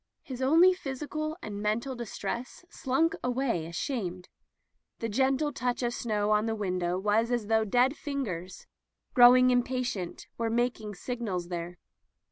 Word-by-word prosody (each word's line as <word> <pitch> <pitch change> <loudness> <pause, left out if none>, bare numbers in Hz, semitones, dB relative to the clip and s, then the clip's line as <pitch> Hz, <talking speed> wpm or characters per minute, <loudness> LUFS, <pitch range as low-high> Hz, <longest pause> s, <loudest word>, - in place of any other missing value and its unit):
His 260 -2 -7
own 330 +8 +6
physical 310 0 -4
and 205 -2 -5
men 210 +1 +1
tal 265 +2 -6
distress 235 - -5
slunk 320 +6 +1
away 245 -9 0
ashamed. 180 - -4 0.7
The 230 - -3
gende 270 +6 +1
touch 250 -1 -2
of 240 0 0
snow 210 -3 -1
on 210 +1 +3
the 225 - -1
window 180 -4 -1
was 210 +4 +1
as 240 -3 0
though 220 +1 +2
dead 250 +6 +3
fingers, 200 - -5 0.5
growing 255 0 +7
impatient, 245 -7 -1
were 230 -1 0
mak 240 0 0
ing 210 -1 -7
signals 195 -6 -4
there. 175 0 -5
235 Hz, 145 wpm, -29 LUFS, 205-260 Hz, 0.7 s, growing